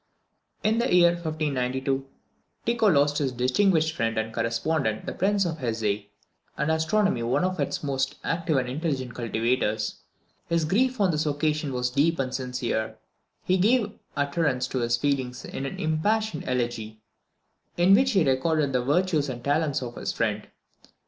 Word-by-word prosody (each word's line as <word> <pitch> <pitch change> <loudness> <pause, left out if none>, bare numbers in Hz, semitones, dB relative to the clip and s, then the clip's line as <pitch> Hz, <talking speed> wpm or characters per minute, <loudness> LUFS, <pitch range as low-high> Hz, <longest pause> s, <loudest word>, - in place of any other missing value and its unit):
In 220 +2 +2
the 240 - 0
year 175 -1 +6
1592, 135 -5 -2 0.6
Tycho 230 -1 +2
lost 145 -4 +3
his 135 -3 0
distinguished 160 +6 +2
friend 115 -3 -1
and 110 0 -2
correspondent 115 +1 -1
the - - -4
Prince 200 +1 +1
of 165 -2 -3
Hesse, 110 -5 -1 0.5
and 150 +1 +1
astronomy 160 - +1
one 120 +8 +1
of 185 -1 -1
its 140 - -2
most 135 -2 -1
active 165 -3 0
and 130 -1 0
intelligent 130 -3 -2
cultivators. 115 -2 -1 0.5
His 170 -1 +1
grief 250 +9 +1
on 195 -3 +3
this 155 0 -1
occasion 150 0 0
was 125 -1 -1
deep 160 +5 +2
and 130 -1 -2
sincere, 125 -3 -1
and - - -12 0.5
he 185 - +2
gave 215 +2 +3 0.3
utterance 140 -3 0
to 130 - -2
his 120 0 +1
feelings 130 -2 -1
in 135 - -4
an - - -6
impassioned 170 +3 0
elegy, 120 -3 -2 0.8
in 175 +3 +5
which 260 +5 +4
he 190 -4 +4
recorded 140 +2 +1
the 125 - +2
virtues 150 +1 +1
and 120 -2 -6
talents 145 -1 +1
of 120 -1 -7
his - - -2
friend. 105 -2 -2
145 Hz, 160 wpm, -26 LUFS, 125-170 Hz, 0.8 s, year